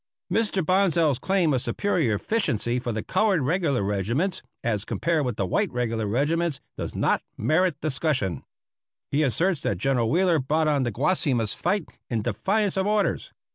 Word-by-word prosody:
Mr. 205 -6 +1
Bonsal's 170 -7 +2
claim 185 -4 +1
of 130 - +1
superior 160 - 0
efficiency 120 - 0
for 120 -1 -3
the 110 -1 -3
colored 200 -9 +1
regular 145 - +1
regiments 115 - -1 0.2
as 105 -4 0
compared 165 +6 0
with 120 - -2
the 100 - -1
white 90 - 0
regular 115 -3 -1
regiments 150 +6 0 0.2
does - - -5
not - - +1 0.2
merit 155 - +1
discussion. 140 - -1 0.7
He 145 - +2
asserts 160 +4 +1
that 100 - -1
General 120 +2 +1
Wheeler 175 +2 +3
brought 155 +4 +1
on 145 -2 +2
the 120 -2 0
Guasimas 130 - 0
fight 200 -5 -1 0.2
in 115 -3 -1
defiance 200 - 0
of 190 +1 +1
orders. 210 -1 0
150 Hz, 160 wpm, -25 LUFS, 120-180 Hz, 0.7 s, Wheeler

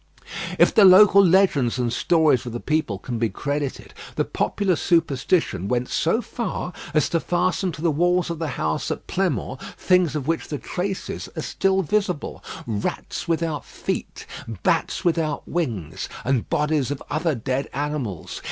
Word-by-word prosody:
If - - +5
the 210 - +6
local 200 +1 +8
legends 170 -10 +3
and 120 -2 0
stories 155 -2 +3
of 120 - -5
the 120 - -3
people 150 -10 -1
can 120 +3 -5
be 115 -1 +1
credited, 145 +1 -4 0.2
the - - +1
popular 195 -3 0
superstition 155 - +1
went 125 +2 -1
so 220 +9 +1
far 205 -6 -4 0.2
as 155 - +4
to 170 - +1
fasten 180 +2 0
to 155 - -8
the 170 - +3
walls 175 +3 +1
of 165 - -5
the 165 - -2
house 80 0 -1
at - - -4
Pleinmont - - -2 0.2
things 180 -5 +2
of 145 -4 -2
which 165 0 -1
the 145 - -3
traces 185 +6 -4
are - - -3
still 195 0 +1
visible 185 -3 -1 0.2
rats 105 -3 -3
without 165 -4 -1
feet, - - -5 0.4
bats - - +1
without 165 -3 0
wings, 100 - -3 0.2
and 130 -2 0
bodies 150 -3 +1
of 145 -1 -4
other 155 +1 0
dead 130 +3 -2
animals. 140 - -4
155 Hz, 160 wpm, -23 LUFS, 130-180 Hz, 0.4 s, local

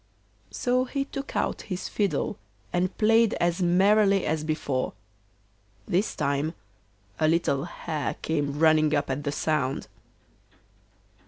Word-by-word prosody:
So 250 +1 0
he 275 +1 -2
took 275 0 -7
out - - -1
his 185 -1 -3
fiddle 195 - -1 0.3
and 180 +1 0
played 225 0 +4
as 175 +1 0
merrily 195 +2 +4
as 155 0 -1
before. 150 -4 -2 0.9
This 190 +5 0
time 145 +4 -1 0.6
a 155 - +3
little 155 -3 +1
hare 160 -3 -4
came 145 -3 -1
running 155 -1 +4
up 145 -1 0
at 140 +2 -3
the 145 - 0
sound. 140 -3 -1
165 Hz, 120 wpm, -26 LUFS, 145-195 Hz, 0.9 s, played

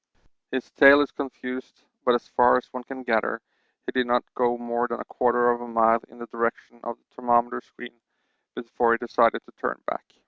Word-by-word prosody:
His 130 -2 -4
tale 140 0 +8
is 145 - -1
confused, 130 -2 -7 0.2
but 125 - +4
as 120 - -3
far 125 0 +4
as 125 - -7
one 125 -1 -6
can 130 +1 -9
gather 115 -3 0 0.5
he - - -4
did 125 -1 0
not 120 0 +2
go 120 -1 +1
more 120 0 -2
than 120 0 -5
a - - -6
quarter 120 0 +2
of 120 0 -3
a 120 - -7
mile 115 0 +3
in 120 - -17
the 120 - -8
direction 115 0 -4
of 120 0 -6
the - - -42
thermometer 120 -1 +1
screen 120 -1 -13 0.5
before 115 0 +1
he - - +1
decided 115 -1 +1
to - - -19
turn - - -3
back. - - -5
120 Hz, 205 wpm, -25 LUFS, 120-125 Hz, 0.5 s, tale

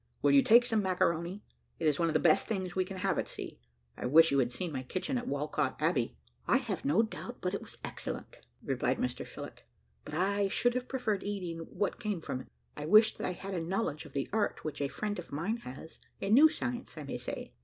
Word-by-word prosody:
Will - - +5
you 280 - +7
take 240 -1 +7
some 225 -3 +2
macaroni. 180 0 0 0.3
It 165 - -3
is 150 -2 +3
one 170 - +3
of 160 - -1
the - - +5
best 155 -1 +4
things 185 -5 -2
we 185 -1 +2
can 190 +1 -7
have 190 +1 0
at - - -2
sea. - - -7 0.4
I - - -3
wish 160 +4 +7
you 140 - +3
had 125 -2 +2
seen 165 +7 -3
my 130 -3 -3
kitchen 185 - -3
at 245 0 -2
Walcot - - -1
Abbey." - - +1 0.3
"I - - +5
have 235 -7 -3
no 155 +11 +4
doubt 235 +2 -6
but 180 +1 -2
it 200 - -2
was - - -11
excellent," - - -6 0.2
replied - - 0
Mr - - -2
Phillott; - - -9 0.4
"but 150 - -7
I 200 +3 +2
should 245 +5 +2
have 250 0 -2
preferred 220 -7 -1
eating 185 -5 -3
what 205 - -2
came 210 -6 -2
from 130 -5 -4
it. - - -14 0.3
I 150 +1 -5
wish 215 +4 +7
that - - -3
I 180 - -1
had 195 +2 -6
a 175 - -1
knowledge 165 -3 -2
of 145 - -13
the 140 - -1
art 215 -2 0
which 155 -2 -3
a 140 - +1
friend 205 +6 -3
of 175 - -9
mine 170 +11 -1
has 140 - -10 0.2
a 195 - -2
new 290 +8 +8
science, 250 - -4
I 155 - -5
may 140 - -5
say." - - -6
190 Hz, 240 wpm, -32 LUFS, 160-220 Hz, 0.4 s, new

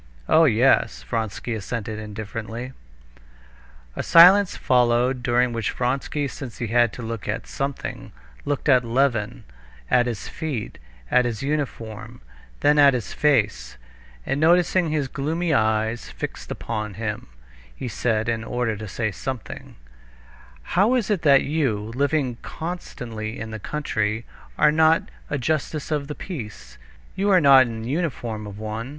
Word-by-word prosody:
"Oh, 165 +1 +6
yes!" 130 0 +3
Vronsky 115 0 -3
assented 110 0 -4
indifferently. 110 +3 -6 1.2
A - - -2
silence 185 +3 +7
followed, 125 +1 +2
during 120 -1 +2
which 115 -3 -1
Vronsky—since 135 0 -3
he 120 - -3
had 120 -1 +3
to 125 - -7
look 115 -5 -5
at - - -3
something—looked 65 - -5
at 130 -3 +5
Levin, 120 -3 0 0.5
at 125 0 +4
his 115 -4 -4
feet, 145 -9 -5 0.3
at 125 - +4
his 115 0 -3
uniform, 115 - -4 0.4
then 150 0 +4
at 140 -2 +7
his 110 -8 -4
face, 120 - +1 0.5
and 135 - -1
noticing 175 +1 +3
his 150 -3 0
gloomy 160 +5 -1
eyes 110 -1 0
fixed - - -7
upon 105 -3 -4
him, 105 0 -4 0.5
he 125 - -5
said, 110 0 -1
in 115 -1 -1
order 120 -1 -1
to 110 +1 -7
say 110 +3 -2
something: 130 +5 -7 1.0
"How 210 +7 +4
is 225 -4 0
it 195 -5 +1
that 140 -3 +5
you, 140 -7 0 0.2
living 140 -2 0
constantly 120 -10 -6
in 110 0 -6
the 110 - -6
country, 110 -5 -2 0.3
are 150 0 +5
not 160 +1 +4 0.3
a 145 - -1
justice 155 +2 -2
of 145 -2 -1
the 150 - -5
peace? 120 - -8 0.4
You 195 +2 0
are 190 -2 +6
not 135 -4 +7
in 115 -1 -6
the 115 - -5
uniform 120 -10 -3
of 100 -1 -9
one." 110 +3 -5
125 Hz, 145 wpm, -23 LUFS, 110-145 Hz, 1.2 s, silence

